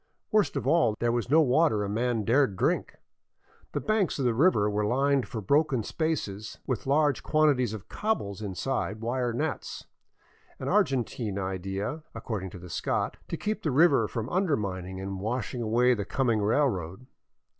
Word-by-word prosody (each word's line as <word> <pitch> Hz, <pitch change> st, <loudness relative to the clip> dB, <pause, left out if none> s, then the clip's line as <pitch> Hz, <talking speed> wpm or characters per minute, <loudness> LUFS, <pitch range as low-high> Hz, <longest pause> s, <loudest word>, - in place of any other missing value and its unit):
Worst 215 Hz, -3 st, +2 dB
of -, -, -2 dB
all, 140 Hz, -10 st, +3 dB
there 120 Hz, 0 st, +1 dB
was 120 Hz, 0 st, -1 dB
no 160 Hz, +3 st, +6 dB
water 135 Hz, -5 st, +3 dB
a -, -, -2 dB
man 115 Hz, +2 st, 0 dB
dared 120 Hz, -1 st, +3 dB
drink. -, -, 0 dB, 0.8 s
The -, -, 0 dB
banks 215 Hz, -4 st, 0 dB
of 135 Hz, -, -1 dB
the 120 Hz, -, +3 dB
river 125 Hz, -, +3 dB
were 105 Hz, 0 st, 0 dB
lined 135 Hz, +4 st, +2 dB
for 110 Hz, -, -5 dB
broken 140 Hz, -, +2 dB
spaces 110 Hz, -, -3 dB
with 130 Hz, -1 st, -3 dB
large 145 Hz, -1 st, +2 dB
quantities 145 Hz, -7 st, +2 dB
of 110 Hz, -3 st, -7 dB
cobbles 155 Hz, -, -2 dB
inside 105 Hz, +1 st, -3 dB
wire 120 Hz, +1 st, -1 dB
nets 145 Hz, +5 st, -3 dB, 0.4 s
— -, -, -32 dB
an -, -, -5 dB
Argentine 120 Hz, -5 st, 0 dB
idea, 95 Hz, -, -3 dB
according 110 Hz, -4 st, -4 dB
to 95 Hz, -, -10 dB
the 90 Hz, 0 st, -10 dB
Scot 85 Hz, -, -2 dB
— -, -, -31 dB
to 165 Hz, -, -3 dB
keep 215 Hz, +5 st, -2 dB
the 155 Hz, -, -1 dB
river 140 Hz, -5 st, +4 dB
from 115 Hz, +1 st, -4 dB
undermining 100 Hz, -, -1 dB
and 95 Hz, 0 st, -5 dB
washing 120 Hz, +4 st, -3 dB
away 120 Hz, +3 st, +3 dB
the 105 Hz, -4 st, -2 dB
coming 115 Hz, 0 st, 0 dB
railroad. 105 Hz, -, 0 dB
120 Hz, 170 wpm, -28 LUFS, 105-145 Hz, 0.8 s, no